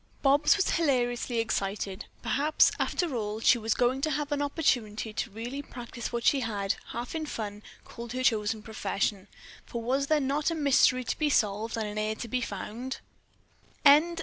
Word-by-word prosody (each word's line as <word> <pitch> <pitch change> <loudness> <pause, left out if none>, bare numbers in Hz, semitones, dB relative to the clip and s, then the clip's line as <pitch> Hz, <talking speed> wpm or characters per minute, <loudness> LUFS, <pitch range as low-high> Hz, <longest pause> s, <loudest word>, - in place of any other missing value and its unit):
Bobs 285 +2 +5
was 400 - +1
hilariously 245 -6 +1
excited. 200 -3 -2 0.2
Perhaps, 300 +3 +3
after 335 -7 0
all, 215 -1 -2
she 240 +2 +4
was 225 -1 0
going 255 +2 +1
to 310 - +1
have 295 0 -2
an 290 0 0
opportunity 235 -8 0
to 225 - -3
really 235 +6 -5
practice 240 -3 -7
what 235 -1 -2
she 280 - +4
had, 205 -4 -1
half 240 +2 -5
in 315 -1 -3
fun, 210 -5 -5 0.2
called 235 0 -8
her 255 0 -2
chosen 220 -3 +1
profession, 205 -2 -2 0.4
for 235 - -6
was 270 +4 0
there 310 0 +3
not 285 +3 0
a 330 - -2
mystery 275 -4 +4
to - - -3
be 305 -1 +2
solved 220 -2 +1
and 220 - -1
an 210 0 -4
heir 215 0 -1
to 235 - -6
be 250 +2 -1
found? 230 +4 -5
240 Hz, 175 wpm, -28 LUFS, 215-280 Hz, 0.4 s, Bobs